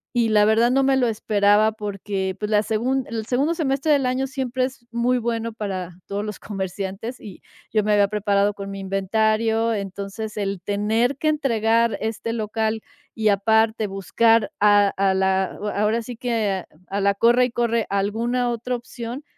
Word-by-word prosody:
Y 230 -2 +2
la 210 -1 +5
verdad, 225 +2 +4
no 270 +1 +3
me 270 0 +3
lo 250 -2 +2
esperaba 210 0 +3
porque, 200 -2 -4
pues, 210 0 -3
la 210 - +4
segun 245 +5 0
en 230 - -6
el 220 - -3
segundo 275 +8 +1
semestre 280 -1 0
del 280 -3 +3
año 260 +1 0
siempre 260 -1 -1
es 260 -2 -9
muy 245 +2 +1
bueno 230 -1 -2
para 190 -5 -4 0.2
todos 200 +1 -3
los 210 -2 -5
comerciantes 195 +4 -5
y 200 -4 -11 0.3
yo 215 -1 +2
me 210 0 +2
había 205 -1 +4
preparado 205 -1 +1
con 200 0 -7
mi 195 0 -6
inventario. 220 +4 +1
Entonces, 200 +2 -5
el 195 -2 -2
tener 220 +7 0
que 310 - +1
entregar 230 -6 +1
este 225 +1 -3
local 220 0 -2 0.3
y, 215 -1 +2
aparte, 220 +2 +2
buscar, 225 +3 +2
a 205 -1 +5
a 195 -1 +2
la 190 0 +2 0.3
ahora 215 +3 +1
sí 245 +1 -7
que, 220 -6 -1 0.2
a 200 +1 -2
la 200 0 +2
corre 240 +4 +4
y 250 - -4
corre, 235 -1 0
alguna 230 +5 0
otra 240 +2 -3
opción, 240 +2 -7
220 Hz, 175 wpm, -22 LUFS, 200-235 Hz, 0.3 s, la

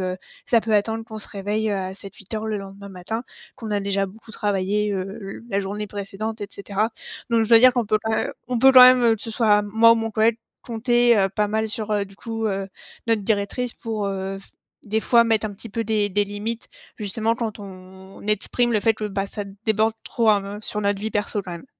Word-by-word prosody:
heu, - - -17 0.3
ça 230 -2 +3
peut 220 -1 -1
attendre 225 +2 +1
qu'on 220 -1 -8
se - - -7
réveille, 210 +2 -2
heu, 205 - 0
à 190 -1 -3
07:00-8:00 200 +2 -7
le 215 - -1
lendemain 200 0 -9
matin. 195 +6 -5 0.3
Qu'on 225 -3 -7
a 205 - +1
déjà 195 0 +1
beaucoup 220 +3 -14
travaillé, 205 0 0
heu, 190 -1 -1 0.2
le 195 0 -8
la 200 0 +1
journée 205 +2 -4
précédente, 205 +2 -5
et 205 - -4
cetera, 200 +2 -2 0.4
donc 230 -1 +3
je 220 - -4
dois 230 -1 +8
dire 255 0 +7
qu'on 240 -3 0
peut 215 +1 +2
quand 220 - -1
même - - -1 0.2
on 250 - -1
peut 265 +1 +7
quand 255 -1 +9
même, 250 0 +8
heu, 230 -1 +4
que - - -14
ce - - -5
soit, 215 -2 +3
moi 225 +3 +5
ou - - +5
mon 225 0 -2
collègue, 220 +1 +2 0.3
compter, 240 0 +3
heu, 195 - +3
pas 210 +1 0
mal 220 +1 0
sur, 215 0 -3
heu, 205 -1 +1
du 195 0 -16
coup, 225 +1 -4
heu, 195 -1 -2 0.4
notre 225 -2 +2
directrice 220 +4 -1
pour, 215 -3 -4
heu, 195 0 -4
f 195 - -18 0.3
des 220 +1 0
fois 235 +1 +4
mettre 225 -1 +2
un 210 - -5
petit 220 +3 -10
peu 230 +2 -2
des 210 -2 +1
des 205 +2 +2
limites, 210 +3 -5 0.3
justement 220 +2 -1
quand 225 -3 -4
on 190 0 -12
exprime 225 +3 +2
le 215 - +3
fait 225 +2 +3
que, 215 - -7
bah, 195 -1 -2
ça 205 - -5 0.2
déborde 220 0 +2
trop, 230 -2 +1
heu, 200 0 -1
sur 210 0 -3
notre 200 -1 0
vie 220 0 -3
perso, 205 0 -1
quand 180 - -7
même. 170 +6 -8
210 Hz, 235 wpm, -23 LUFS, 200-225 Hz, 0.4 s, quand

